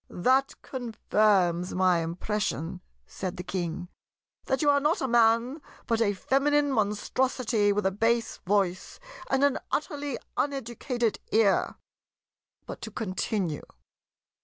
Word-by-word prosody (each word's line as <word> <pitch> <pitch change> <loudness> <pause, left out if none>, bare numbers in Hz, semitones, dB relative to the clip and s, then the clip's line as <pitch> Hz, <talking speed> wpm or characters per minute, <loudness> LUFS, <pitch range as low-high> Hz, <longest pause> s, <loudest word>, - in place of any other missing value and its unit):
"That 260 +9 +1
confirms 210 -7 +1
my 185 -2 +3
impression," 180 0 -3 0.2
said 185 - -5
the 180 - -5
King, 175 -1 -3 0.6
"that 265 +4 0
you 295 - +4
are 285 - +3
not 300 +4 +1
a 265 - -1
Man, 235 +4 +3 0.2
but 230 -1 0
a 205 -2 +3
feminine 285 +7 +2
Monstrosity 220 0 +1
with 205 0 0
a 190 - +3
bass 230 +3 0
voice, 190 -2 -1 0.3
and 270 +1 +2
an 285 -2 +3
utterly 290 -3 -2 0.2
uneducated 245 -3 -1
ear. 215 -3 +3 0.9
But - - -8
to 225 - -5
continue. 190 -5 -2
220 Hz, 120 wpm, -28 LUFS, 190-265 Hz, 0.9 s, you